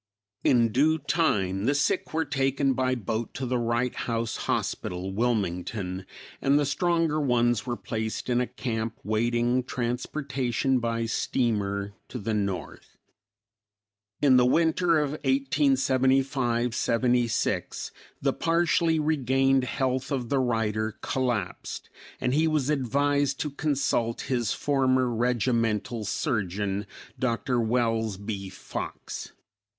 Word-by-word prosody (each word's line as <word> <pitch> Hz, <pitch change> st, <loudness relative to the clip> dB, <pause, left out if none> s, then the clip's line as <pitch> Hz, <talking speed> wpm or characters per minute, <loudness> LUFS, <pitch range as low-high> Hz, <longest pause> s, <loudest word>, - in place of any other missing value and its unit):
In 120 Hz, -3 st, +4 dB
due 150 Hz, +7 st, +3 dB
time, 120 Hz, -, 0 dB
the 140 Hz, +3 st, +2 dB
sick 145 Hz, +5 st, 0 dB
were 160 Hz, 0 st, 0 dB
taken 135 Hz, -1 st, +1 dB
by 130 Hz, 0 st, +1 dB
boat 110 Hz, 0 st, -3 dB
to 130 Hz, -, -3 dB
the 125 Hz, 0 st, 0 dB
Wright 120 Hz, +1 st, 0 dB
House 115 Hz, -1 st, -2 dB
Hospital, 90 Hz, +2 st, -2 dB
Wilmington, 95 Hz, -4 st, -1 dB, 0.3 s
and 140 Hz, +1 st, +4 dB
the 145 Hz, -, +2 dB
stronger 165 Hz, +1 st, +1 dB
ones 120 Hz, -3 st, +2 dB
were 120 Hz, -1 st, -2 dB
placed 110 Hz, -1 st, -4 dB
in 125 Hz, -1 st, +2 dB
a 125 Hz, -, -1 dB
camp 115 Hz, -2 st, -3 dB
waiting 120 Hz, +3 st, +1 dB
transportation 130 Hz, +1 st, -1 dB
by 115 Hz, -1 st, -1 dB
steamer 100 Hz, -4 st, -1 dB
to -, -, -6 dB
the 110 Hz, 0 st, -2 dB
north. 100 Hz, -3 st, -4 dB, 1.3 s
In 130 Hz, -3 st, +6 dB
the 125 Hz, -, +5 dB
winter 165 Hz, +3 st, +3 dB
of 150 Hz, -2 st, +1 dB
1875 135 Hz, -2 st, +2 dB
76, 120 Hz, 0 st, 0 dB, 0.3 s
the -, -, +1 dB
partially 165 Hz, -1 st, +2 dB
regained 135 Hz, -3 st, +2 dB
health 130 Hz, 0 st, -1 dB
of 125 Hz, -4 st, -2 dB
the 140 Hz, -, +2 dB
writer 110 Hz, -3 st, 0 dB
collapsed, 120 Hz, -8 st, -2 dB, 0.3 s
and 125 Hz, -, 0 dB
he 155 Hz, +3 st, +3 dB
was 150 Hz, -2 st, +1 dB
advised 140 Hz, +1 st, +1 dB
to 150 Hz, -, -2 dB
consult 135 Hz, -6 st, 0 dB
his 120 Hz, -6 st, -1 dB
former 130 Hz, -3 st, +2 dB
regimental 115 Hz, -2 st, 0 dB
surgeon, 100 Hz, -, -1 dB, 0.3 s
Dr. 125 Hz, 0 st, 0 dB
Wells 115 Hz, -3 st, 0 dB
B. 100 Hz, -1 st, -5 dB
Fox. 95 Hz, -, -6 dB
125 Hz, 120 wpm, -27 LUFS, 115-135 Hz, 1.3 s, In